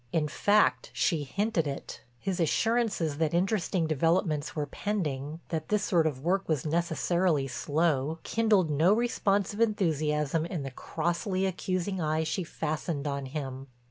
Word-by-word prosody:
In 155 -2 +1
fact 145 - +2
she 145 +5 +1
hinted 200 - 0
it; 140 - -6 0.2
his 185 +8 -3
assurances 195 -4 +1
that 160 0 +1
interesting 185 -2 +1
developments 160 0 +1
were 150 -2 -1
pending, 155 -4 -3
that 160 -2 -3
this 210 -1 +2
sort 170 -5 +3
of 135 -4 -3
work 190 +3 0
was 155 -4 0
necessarily 170 -1 +1
slow, 150 +1 0
kindled 210 -8 +2
no 160 +7 +4
responsive 205 -3 +1
enthusiasm 155 -7 +1
in 170 -5 -4
the 135 - -5
crossly 175 - -1
accusing 185 0 -2
eye 155 0 +1
she 180 +4 -2
fastened 155 -1 -3
on 140 -2 -2
him. 135 -1 -5
165 Hz, 140 wpm, -29 LUFS, 150-190 Hz, 0.2 s, no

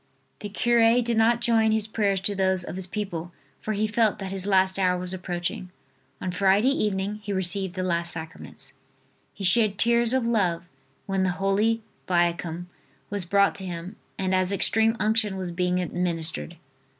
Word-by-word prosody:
The 205 - -6
cure 235 +2 +3
did 235 0 -1
not 230 +2 +3
join 225 -2 +3
his 220 -1 +3
prayers 205 -3 0
to 205 +1 0
those 190 -2 +1
of - - -7
his 190 -1 -5
people 180 -4 -5 0.3
for 215 - -3
he 210 +1 0
felt 215 0 +1
that 190 -1 -6
his 195 0 -1
last 190 -1 +2
hour 180 -1 +2
was 180 0 -5
approaching. 180 0 -4 0.5
On 185 - -3
Friday 195 +6 +3
evening 210 -4 -1
he 205 - -5
received 190 0 +2
the 185 - -2
last 170 -2 0
sacraments. 160 +2 -7 0.6
He 200 - -8
shed 200 +2 +3
tears 235 +1 +3
of 260 -2 +1
love 185 -8 +1 0.4
when 195 -1 -1
the 185 -1 0
Holy 210 +4 +1 0.2
Viaticum 175 -1 0 0.5
was 200 -3 -3
brought 200 +2 +3
to 190 - -6
him 180 +2 -6 0.2
and 190 0 -1
as 185 0 +2
Extreme 220 +3 +2
Unction 215 -2 0
was 185 -2 -4
being 180 +1 0
administered. 165 - -2
195 Hz, 175 wpm, -25 LUFS, 180-215 Hz, 0.6 s, cure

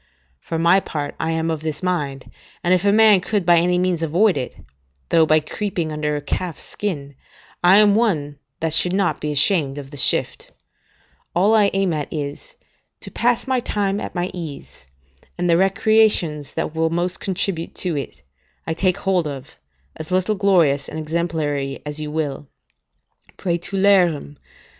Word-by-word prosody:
For 165 - -5
my 170 +4 +4
part, 145 -6 -5
I 160 - -1
am 165 0 -1
of 160 -2 -3
this 155 +1 -4
mind, 145 -7 -3 0.3
and 175 +1 +3
if 180 0 +2
a 200 - +4
man 215 -2 +6
could 200 -1 -1
by 175 0 +5
any 180 +1 +1
means 180 -2 0
avoid 175 +6 +2
it, 125 - -4 0.5
though 160 -1 +4
by 155 0 +5
creeping 170 0 -3
under 150 -1 -2
a 145 - -3
calf's 175 +2 -4
skin, 145 -9 -5 0.5
I 180 +3 +7
am 210 -1 +6
one 155 -11 0 0.2
that 160 -1 0
should 175 +2 +3
not 180 -6 0
be 150 - -2
ashamed 145 -1 +2
of 140 -1 -8
the 145 - -9
shift; - - +1 0.8
all 195 +5 +3
I 210 -2 +5
aim 195 -3 +1
at 150 -2 -4
is, 145 -2 -6 0.5
to - - -8
pass 240 0 +1
my 260 -1 +1
time 205 -4 -1
at - - -7
my 175 +1 -2
ease, 160 - -9 0.5
and 175 0 -1
the 170 - +4
recreations 195 -6 +2
that - - -2
will 160 0 0
most 175 +2 -1
contribute 185 -3 -3
to 175 -4 -2
it, 115 - -6 0.4
I 160 - -2
take 185 +2 0
hold 185 -4 0
of, 140 -1 -8 0.4
as 155 - -8
little 185 +3 +1
glorious 175 -9 +2
and - - -7
exemplary 155 -4 -2
as 150 +1 -5
you 150 -1 -4
will: 150 -2 -3 0.9
"Praetulerim 175 -4 +1
170 Hz, 170 wpm, -21 LUFS, 150-190 Hz, 0.9 s, I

